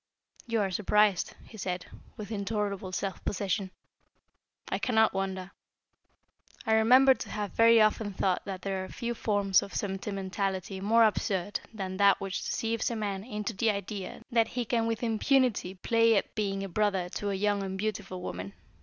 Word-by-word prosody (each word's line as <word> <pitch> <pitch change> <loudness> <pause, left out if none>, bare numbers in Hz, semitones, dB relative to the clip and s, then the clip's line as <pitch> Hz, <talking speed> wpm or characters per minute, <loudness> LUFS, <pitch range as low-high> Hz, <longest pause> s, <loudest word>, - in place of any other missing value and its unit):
"You 230 -2 +1
are 195 -2 0
surprised," 210 0 +2
he 220 - -13
said, 180 -1 -3 0.3
with 210 0 -7
intolerable 200 -2 -2
self 190 +1 -3
possession. 195 0 -1 1.0
"I - - -2
cannot 220 -3 +3
wonder. 190 -1 -3 1.1
I 220 - +2
remember 255 +5 +6
to - - -8
have 210 -2 -3
very 230 0 +6
often 215 -1 +2
thought 185 -1 0
that 190 -2 -6
there 195 -1 -2
are - - -6
few 235 0 -3
forms 205 -4 +2
of 200 - -8
sentimentality 195 -1 -3
more 225 +3 +5
absurd 205 -2 0
than 190 -4 -5
that 200 0 +5
which 195 -1 -3
deceives 225 0 -1
a 235 - -3
man 200 -3 -3
into 210 -2 -4
the 220 +3 +1
idea 200 -1 -4
that 230 -1 +3
he 245 -1 -3
can 230 0 +1
with 230 +1 -2
impunity 225 -4 +2
play 230 +4 +3
at 200 - 0
being 195 -2 -2
a - - -3
brother 195 -2 +1
to 205 +3 -3
a 200 - -1
young 205 +1 +1
and 190 -1 -4
beautiful 195 -3 -4
woman. 90 - -5
205 Hz, 170 wpm, -29 LUFS, 190-220 Hz, 1.1 s, remember